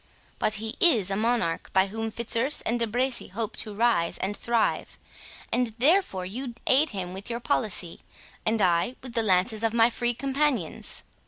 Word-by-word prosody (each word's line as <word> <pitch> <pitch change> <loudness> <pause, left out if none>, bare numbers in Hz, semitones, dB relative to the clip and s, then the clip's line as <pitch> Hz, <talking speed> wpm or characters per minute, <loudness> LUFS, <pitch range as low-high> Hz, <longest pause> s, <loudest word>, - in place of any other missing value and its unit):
But 215 - +1
he 220 +1 -4
is 225 - +4
a - - 0
monarch 225 -6 0
by 190 0 +5
whom 225 +3 -4
Fitzurse 235 +5 +1
and 240 +1 -1
De 230 - +1
Bracy 250 +3 0
hope 215 +3 -4
to 215 - -4
rise 220 -7 +1
and 200 +2 -2
thrive; 235 0 -1 0.6
and 240 -3 0
therefore 270 - +2
you 240 +5 -6
aid 290 +4 +4
him 185 -3 -5
with 195 +4 -7
your 235 0 -3
policy, 215 - 0 0.4
and 220 -1 +1
I 175 +7 +2
with 255 -2 -8
the 230 - +2
lances 215 +2 +2
of 225 0 +1
my 230 +1 +5
Free 240 0 -1
Companions." 270 - -1
225 Hz, 175 wpm, -26 LUFS, 200-245 Hz, 0.6 s, by